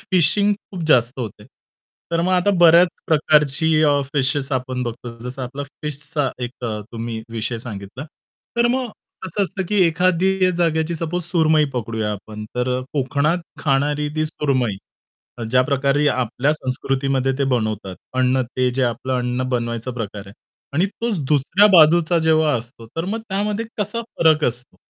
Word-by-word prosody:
Fishing 195 +4 +3
खूप 190 -3 -9
जास्त 125 -3 +3
होते. 110 -5 -6 0.7
तर 165 0 +1
मग 180 +2 +1
आता 185 +2 +3
बऱ्याच 170 +1 +7 0.2
प्रकारची 155 0 +3
अ, 145 -2 +4
फिशेस 135 0 +1
आपण 130 0 -2
बघतो. 120 0 -6
जसं 130 +1 -6
आपला 135 +3 -5 0.2
फिशचा 145 -1 -2
एक 120 +1 -8
अ, 110 -2 -3
तुम्ही 115 -1 -5
विषय 115 +1 -3
सांगितला. 110 +2 -8 0.5
तर 235 - +4
मग 250 +1 0 0.4
कसं 190 +2 -1
असतं, 190 0 -2
की 210 - 0
एखादी 185 +2 +2
जागेची 165 -1 +1
सपोज 170 +2 -3
सुरमई 160 -3 +3
पकडूया 110 -3 -2
आपण, 105 +1 -8
तर 125 +1 0
कोकणात 145 +4 +1 0.2
खाणारी 145 +1 +1
ती 155 0 0
सुरमई 130 -9 -1 0.6
अ, - - -5
ज्या 125 +1 +5
प्रकारे 140 +2 +1
आपल्या 125 +2 0
संस्कृतीमध्ये 135 -1 -1
ते 140 - +2
बनवतात. 110 -5 -1 0.2
अन्न 130 0 +2
ते 125 0 +2
जे 130 +2 -1
आपलं 130 +2 -1
अन्न 125 +1 -1
बनवायचा 120 -1 -2
प्रकार 105 -4 -6
आहे. 95 - -12 0.4
आणि 170 +6 +3
तोच 220 0 -3
दुसऱ्या 150 +8 +4
बाजूचा 170 0 +6
जेव्हा 160 -1 +3
असतो, 115 0 -12
तर 165 - -1
मग 215 +5 -3
त्यामध्ये 205 +3 -1
कसा 210 +3 -2 0.2
फरक 155 -2 +4
असतो 120 +1 -3
140 Hz, 155 wpm, -21 LUFS, 125-165 Hz, 0.7 s, बऱ्याच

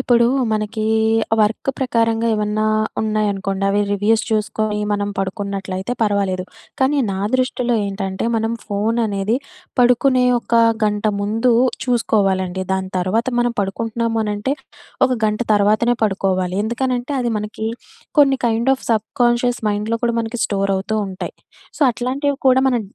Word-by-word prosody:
ఇప్పుడూ 240 -2 +3 0.2
మనకీ 215 0 -2 0.6
వర్క్ 215 +5 0
ప్రకారంగా 230 -3 +1
ఏవన్నా 210 0 -1 0.4
ఉన్నాయనుకోండి. 200 -2 -1
అవి 205 +1 +2
రివ్యూస్ 210 +2 +2
చూసుకోని 215 0 -1
మనం 205 0 -1
పడుకున్నట్లయితే 195 +1 -3
పర్వాలేదు. 200 -3 0 0.4
కానీ 280 +2 +3
నా 190 - -3 0.2
దృష్టిలో 250 -1 0
ఏంటంటే, 195 0 -3
మనం 225 +1 0
ఫోననేది 210 0 0 0.4
పడుకునే 250 +1 +4
ఒక 235 - -3 0.3
గంట 210 0 -1 0.2
ముందు 225 +4 +1 0.3
చూసుకోవాలండి. 195 -6 +1
దాని 190 0 -2
తర్వాత 190 +6 0
మనం 240 0 +1
పడుకుంటున్నాము 225 +3 -2
అనంటే 210 +5 -2 0.5
ఒక - - -5
గంట 215 +1 0
తర్వాతనే 215 +4 +3
పడుకోవాలి. 190 -3 0
ఎందుకనంటే 250 +3 -2
అది 240 -1 -1
మనకి 210 +1 -4 0.5
కొన్ని 275 -2 +5
కైండ్ 230 +3 +1
ఆఫ్ - - -12
సబ్‌కాన్షియస్ 240 +2 +1
మైండ్‍లో 210 +2 -1
కూడా 235 -1 +1
మనకి 225 0 -4
స్టోరవుతూ 195 +1 -1
ఉంటాయి. 185 -1 -6 0.4
సో, - - -14
అట్లాంటివి 270 +4 -1
కూడా 260 +1 +5
మనం 245 -3 +1
215 Hz, 125 wpm, -19 LUFS, 200-240 Hz, 0.6 s, కొన్ని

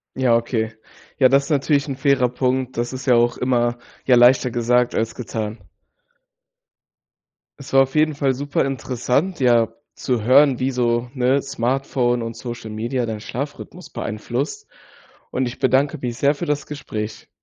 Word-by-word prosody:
Ja, 130 -3 +3
okay. 115 -2 -2 0.4
Ja, 130 - +6
das 135 +1 +3
ist - - -10
natürlich 145 0 +2
'n 135 - -3
fairer 135 -2 +2
Punkt. 130 +1 -1
Das 120 +1 -2
ist 130 +1 -7
ja 125 - +5
auch 120 0 +3
immer, 120 -1 +1 0.3
ja, 125 - +5
leichter 125 +1 +5
gesagt 120 +1 +1
als 115 0 -1
getan. 110 -2 -5 2.0
Es 140 - -10
war 135 0 +7
auf 135 +2 -4
jeden 155 0 +3
Fall 140 -2 +1
super 145 +2 -1
interessant, 135 +6 -1
ja, 120 -3 +4 0.3
zu 125 -4 -1
hören, 130 +2 +5
wie 130 +1 +1
so, 120 -1 0
ne, 130 +1 +2
Smartphone 125 -2 -1
und 115 0 -5
Social 120 -2 -7
Media 120 +4 -2
deinen 110 -2 -4
Schlafrhythmus 145 +9 -7
beeinflusst. 125 - -4 0.6
Und 130 0 0
ich 120 - -6
bedanke 140 +3 +2
mich 120 -3 -4
sehr 145 +1 +2
für 170 - -4
das 150 -1 -1
Gespräch. 110 -7 -6
125 Hz, 160 wpm, -21 LUFS, 120-140 Hz, 2.0 s, war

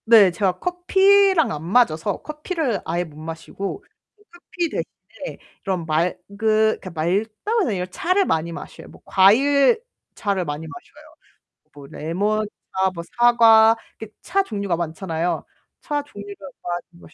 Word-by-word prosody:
네. 220 -5 +7
제가 185 +1 0
커피랑 380 +1 +3
안 150 0 -5
맞아서 185 -2 +2
커피를 305 - -3
아예 175 +2 -1
못 155 -3 -13
마시고 165 - -6 0.3
그 415 - -25
커피 350 0 -4
대신에 - - -7 0.3
그런 185 -4 -2
맑으 165 +3 +1 0.2
그 220 0 +3
맑다고 205 - -1
해야 - - -1
되나 185 -4 -1
차를 365 - 0
많이 165 - 0
마셔요. - - -9
뭐 - - -16
과일 275 - +4 0.4
차를 200 -3 -1
많이 150 +1 -5
마셔요. 145 -2 -14 0.6
뭐 140 -1 -12
레몬차, 205 +8 -2 0.4
뭐 170 -2 -6
사과 230 -2 +6 0.2
이렇게 220 -1 -9
차 390 +3 +1
종류가 200 - -2
많잖아요. 165 +1 -3 0.4
차 290 -1 -2
종류를 405 +7 -10 0.3
많이 175 0 -4 0.2
마셔 155 - -16
205 Hz, 280 characters per minute, -22 LUFS, -, 0.6 s, 네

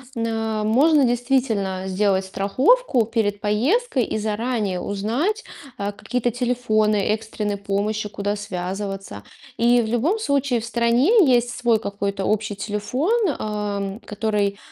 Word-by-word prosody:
на 225 -1 -1
Можно 280 +7 +4
действительно 240 -6 0
сделать 190 0 +1
страховку 255 - +2
перед 210 -2 -1
поездкой 255 - +1
и - - -3
заранее 215 -3 -1
узнать, 245 - -1 0.3
а, 200 0 -2
какие-то 245 +3 -2
телефоны 235 -3 +1
экстренной 215 -1 -2
помощи, 205 +2 -2
куда 205 0 -3
связываться. 195 - -5 0.3
И, 240 +1 +4
в 225 - -3
любом 245 - +1
случае, 275 - 0
в - - -6
стране 245 - +3
есть 245 -1 +3
свой 240 -2 +1
какой-то 200 -1 -3
общий 215 -1 0
телефон, 210 - -2 0.3
ам, 205 -1 -3
который 210 -2 -1
220 Hz, 120 wpm, -22 LUFS, 205-245 Hz, 0.3 s, Можно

